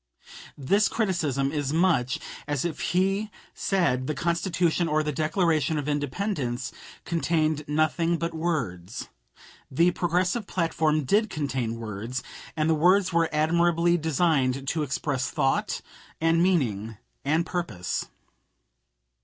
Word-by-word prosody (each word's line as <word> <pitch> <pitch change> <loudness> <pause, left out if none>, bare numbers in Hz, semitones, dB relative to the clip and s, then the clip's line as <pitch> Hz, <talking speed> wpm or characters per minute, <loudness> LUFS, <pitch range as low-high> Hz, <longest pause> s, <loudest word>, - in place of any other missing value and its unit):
This 200 +10 +3
criticism 155 - 0
is 145 -2 -2
much 160 -6 +2 0.3
as 145 0 -1
if 170 -3 -3
he 195 +4 +1 0.2
said 150 -10 0
the 155 - -1
Constitution 170 0 +1
or 155 0 +1
the 150 - -1
Declaration 160 +1 +1
of 145 -1 -3
Independence 145 - -2 0.3
contained 160 -2 0
nothing 155 +3 +1
but 170 0 -3
words. 120 - -3 0.6
The 170 +6 +3
Progressive 180 +5 0
platform 160 -3 +1
did 210 - +2
contain 135 - -2
words, 115 +3 -5 0.3
and 155 0 +2
the 160 - +4
words 180 +4 +3
were 165 -1 +3
admirably 170 +2 +3
designed 145 -5 +1
to 160 - -1
express 135 -1 -1
thought 135 0 0 0.4
and 165 +1 +3
meaning 115 - +1 0.3
and 160 +4 +1
purpose. 110 - -3
155 Hz, 120 wpm, -26 LUFS, 135-175 Hz, 0.6 s, the